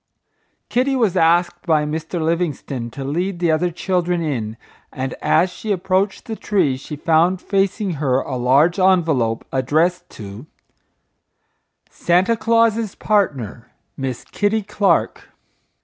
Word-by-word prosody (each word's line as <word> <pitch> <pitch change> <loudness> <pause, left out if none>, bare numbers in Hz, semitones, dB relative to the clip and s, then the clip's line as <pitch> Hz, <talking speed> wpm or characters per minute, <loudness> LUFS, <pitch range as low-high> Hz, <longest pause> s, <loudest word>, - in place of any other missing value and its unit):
Kitty 260 +3 +1
was 220 -8 +1
asked 175 0 +2
by 155 -2 +3
Mr. 160 +3 -4
Livingstone 155 -7 -2
to 135 +4 -7
lead 175 +7 -2
the 170 -1 +1
other 175 +3 +1
children 175 0 -1
in, 115 -8 -3 0.3
and 130 -1 -4
as 175 +3 +2
she 215 - -5
approached 190 +1 0
the 225 - -5
tree 185 -12 +1
she 135 +3 -8
found 165 +4 +2
facing 195 +1 0
her 130 -3 +2
a 130 - -4
large 135 +9 +3
envelope 160 -12 +2
addressed 155 +7 0
to, 105 +6 -9 1.4
Santa 180 +6 +2
Claus's 230 -1 +1
Partner, 130 - -1 0.3
Miss 130 -3 -4
Kitty 210 +1 -1
Clark. 195 -3 0
170 Hz, 125 wpm, -20 LUFS, 140-190 Hz, 1.4 s, by